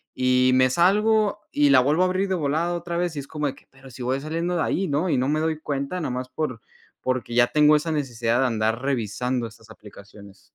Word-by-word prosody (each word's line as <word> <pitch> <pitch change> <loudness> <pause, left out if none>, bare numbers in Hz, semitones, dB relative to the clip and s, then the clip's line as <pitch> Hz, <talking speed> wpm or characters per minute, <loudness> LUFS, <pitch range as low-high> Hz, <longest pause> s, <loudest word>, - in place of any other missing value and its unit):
y 130 0 +3
me 130 0 +4
salgo, 210 +5 +2
y 145 -1 +3
la 135 -2 +7
vuelvo 150 +7 +1
a - - +3
abrir 185 +2 0
de 190 - +1
volada 160 +3 -1
otra 170 0 -4
vez 175 -2 -1
y - - -3
es 140 - -8
como 150 -2 -3
de 135 - -4
que, - - -21
pero 135 0 -16
si 125 +1 -8
voy 130 +2 -1
saliendo 165 +3 -2
de - - +1
ahí, 190 +1 -1
¿no? 150 +5 0
Y - - +1
no 130 +2 0
me 155 +1 +1
doy 160 -1 -1
cuenta 145 +4 -3
nomás 125 -3 -3
por 130 -7 -4 0.4
porque 130 -2 -2
ya 120 0 +5
tengo 150 +2 +4
esa 150 +2 -1
necesidad 120 -5 -1
de 130 - +3
andar 115 0 -1
revisando 125 -1 -2
estas 110 0 -17
aplicaciones. 100 -2 -15
140 Hz, 235 wpm, -24 LUFS, 125-165 Hz, 0.4 s, la